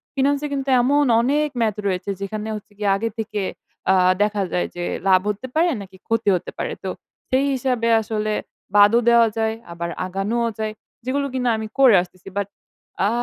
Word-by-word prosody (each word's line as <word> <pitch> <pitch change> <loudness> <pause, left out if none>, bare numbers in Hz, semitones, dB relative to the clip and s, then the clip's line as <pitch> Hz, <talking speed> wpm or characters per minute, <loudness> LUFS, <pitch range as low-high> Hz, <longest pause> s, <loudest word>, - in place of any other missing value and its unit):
Finance 280 +1 +2
এ - - -1
কিন্তু 275 -1 -2
এমন 285 +4 +3 0.2
অনেক 295 +4 +2
math 215 -2 +1
রয়েছে 185 +1 -2
যেখানে 215 +2 -4
হচ্ছে 210 0 -10
গিয়ে 205 -1 0
আগে 230 +2 -2
থেকে 215 -1 -2 0.5
আ - - +5 0.3
দেখা 210 -1 0
যায় 180 - 0
যে 175 - -4 0.2
লাভ 185 -1 +6
হতে 210 +5 -3
পারে? 340 +2 +4
নাকি 190 -1 -12
ক্ষতি 225 -2 +1
হতে - - -4
পারে? - - -2
তো - - -2 0.4
সেই 265 +2 +2
হিসাবে 250 -3 0
আসলে 215 -1 -2 0.4
বাদও 205 +3 +7
দেওয়া 235 -1 +6
যায়। 220 0 0 0.2
আবার 170 0 -4 0.2
আগানোও 205 +6 -1
যায়। 215 0 -2 0.3
যেগুলো 280 +2 0
কিনা 250 -1 +1
আমি 220 - -4
করে 255 -6 +7
আসতেছি। 180 +1 -12
বাট, 200 -1 0 0.6
আ - - +2
220 Hz, 180 wpm, -22 LUFS, 200-255 Hz, 0.6 s, বাদও